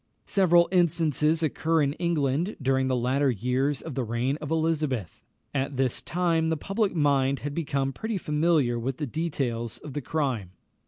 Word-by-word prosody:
Several 175 Hz, -3 st, +4 dB
instances 165 Hz, -3 st, +2 dB
occur 160 Hz, +1 st, +1 dB
in 140 Hz, 0 st, 0 dB
England 165 Hz, +1 st, 0 dB
during 130 Hz, -1 st, +1 dB
the 130 Hz, -, +1 dB
latter 130 Hz, +3 st, +1 dB
years 125 Hz, +5 st, 0 dB
of 160 Hz, -, -6 dB
the 130 Hz, -, -1 dB
reign 120 Hz, +4 st, -1 dB
of 150 Hz, -2 st, -7 dB
Elizabeth. 155 Hz, -, -1 dB, 0.3 s
At 140 Hz, 0 st, -2 dB
this 130 Hz, -2 st, 0 dB
time 165 Hz, -2 st, +1 dB
the 160 Hz, 0 st, 0 dB
public 195 Hz, +4 st, -1 dB
mind 140 Hz, -3 st, +2 dB
had 145 Hz, +1 st, -4 dB
become 140 Hz, -4 st, -1 dB
pretty 220 Hz, +4 st, -3 dB
familiar 150 Hz, -7 st, +1 dB
with 130 Hz, +2 st, -3 dB
the 150 Hz, -, -2 dB
details 130 Hz, -6 st, -2 dB
of 145 Hz, -, -9 dB
the 145 Hz, -, -3 dB
crime. 125 Hz, -, -2 dB
145 Hz, 165 wpm, -27 LUFS, 130-165 Hz, 0.3 s, Several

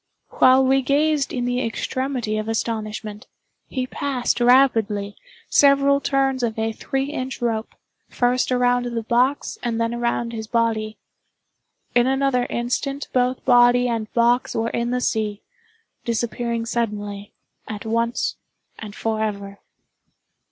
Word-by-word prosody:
While 260 Hz, +1 st, +5 dB
we 270 Hz, +1 st, +3 dB
gazed 290 Hz, +1 st, +1 dB
in 245 Hz, -2 st, -2 dB
the 245 Hz, +1 st, 0 dB
extremity 240 Hz, -1 st, -2 dB
of 215 Hz, -, -4 dB
astonishment, 215 Hz, -2 st, -4 dB, 0.4 s
he 255 Hz, -2 st, -3 dB
passed, 255 Hz, -2 st, -2 dB
rapidly, 225 Hz, -5 st, +3 dB, 0.3 s
several 280 Hz, 0 st, +4 dB
turns 270 Hz, -2 st, +1 dB
of 225 Hz, -2 st, -1 dB
a 225 Hz, 0 st, 0 dB
three 270 Hz, +5 st, -3 dB
inch 260 Hz, -2 st, -4 dB
rope, 225 Hz, -2 st, -2 dB, 0.3 s
first 250 Hz, +1 st, +1 dB
around 245 Hz, 0 st, +2 dB
the 235 Hz, -1 st, -3 dB
box 250 Hz, +5 st, 0 dB
and 235 Hz, -2 st, -2 dB
then 230 Hz, 0 st, 0 dB
around 235 Hz, 0 st, -1 dB
his 220 Hz, -1 st, -5 dB
body. 220 Hz, -2 st, 0 dB, 1.0 s
In 245 Hz, 0 st, +4 dB
another 270 Hz, -2 st, +1 dB
instant 275 Hz, +4 st, -2 dB
both 250 Hz, 0 st, 0 dB
body 245 Hz, 0 st, +5 dB
and 225 Hz, -3 st, -3 dB
box 240 Hz, +1 st, +2 dB
were 225 Hz, +1 st, -1 dB
in 235 Hz, 0 st, -1 dB
the 250 Hz, 0 st, -1 dB
sea—disappearing 235 Hz, -, -4 dB
suddenly, 205 Hz, -3 st, -3 dB, 0.4 s
at 210 Hz, -1 st, -6 dB
once 230 Hz, +1 st, -1 dB, 0.4 s
and 210 Hz, -2 st, -8 dB
forever. 210 Hz, -3 st, -3 dB
240 Hz, 125 wpm, -22 LUFS, 225-260 Hz, 1.0 s, While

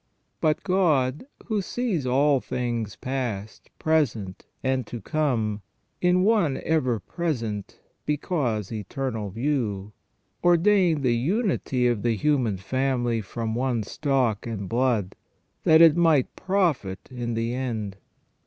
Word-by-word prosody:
But 155 Hz, -1 st, +1 dB
God, 160 Hz, -, +1 dB, 0.2 s
who 215 Hz, -3 st, 0 dB
sees 190 Hz, -, -2 dB
all 140 Hz, +2 st, +3 dB
things 120 Hz, -5 st, -3 dB
past, 120 Hz, -6 st, -4 dB
present, 115 Hz, -12 st, 0 dB, 0.2 s
and 130 Hz, -3 st, 0 dB
to 120 Hz, -, -6 dB
come 110 Hz, -5 st, -1 dB, 0.4 s
in 180 Hz, +1 st, +3 dB
one 195 Hz, -10 st, +2 dB
ever 130 Hz, -8 st, +1 dB
present 115 Hz, -, -4 dB, 0.3 s
because 140 Hz, -, -1 dB
eternal 110 Hz, 0 st, -3 dB
view, 105 Hz, -4 st, -2 dB, 0.5 s
ordained 175 Hz, -3 st, +4 dB
the 120 Hz, -2 st, +3 dB
unity 150 Hz, -, 0 dB
of 120 Hz, -4 st, +1 dB
the 115 Hz, 0 st, +1 dB
human 125 Hz, -4 st, +1 dB
family 120 Hz, +2 st, 0 dB
from 110 Hz, +2 st, -4 dB
one 120 Hz, -2 st, 0 dB
stock 125 Hz, -4 st, 0 dB
and 105 Hz, -4 st, -4 dB
blood, 115 Hz, -4 st, +1 dB, 0.5 s
that 160 Hz, +1 st, +7 dB
it 165 Hz, -2 st, +7 dB
might 160 Hz, -6 st, +3 dB
profit 170 Hz, -, 0 dB
in 120 Hz, -2 st, -3 dB
the 115 Hz, +1 st, -1 dB
end. 110 Hz, -6 st, -3 dB
130 Hz, 120 wpm, -25 LUFS, 110-155 Hz, 0.5 s, that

